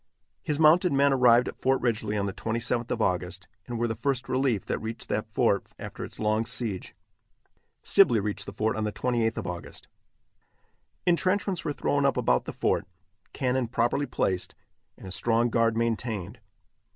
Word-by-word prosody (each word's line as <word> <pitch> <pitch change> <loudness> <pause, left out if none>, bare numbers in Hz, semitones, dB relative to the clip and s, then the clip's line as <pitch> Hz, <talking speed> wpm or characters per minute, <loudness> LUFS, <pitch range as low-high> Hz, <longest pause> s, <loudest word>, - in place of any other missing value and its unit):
His 150 - -1
mounted 160 +3 +5
men 140 0 +4
arrived 125 -2 +5
at - - -7
Fort 135 0 +2
Ridgely 110 -3 -1
on 100 - 0
the 100 - -3
27th 115 +2 -2
of 110 - 0
August, 95 +1 -2 0.2
and 120 -1 -4
were 120 +1 0
the 110 - -1
first 130 +3 -1
relief 130 -6 0
that - - -2
reached 110 +1 -7
that - - -2
fort - - +1
after - - -7
its - - -8
long 110 +1 +1
siege. 115 -5 -3 0.9
Sibley 115 - +5
reached 105 0 -3
the - - -5
fort 110 +2 -1
on 110 - -2
the 105 - -1
28th 115 -1 0
of 110 - -4
August. 90 -1 -7 1.2
Intrenchments 185 +1 +1
were - - -1
thrown 145 0 0
up - - 0
about 60 0 +2
the - - -4
fort, - - 0 0.4
cannon 130 -1 0
properly 120 +4 0
placed, 95 -1 -1 0.4
and - - -13
a 95 - -7
strong 115 +4 +2
guard 115 -1 +2
maintained. 115 -2 -2
115 Hz, 175 wpm, -27 LUFS, 105-130 Hz, 1.2 s, mounted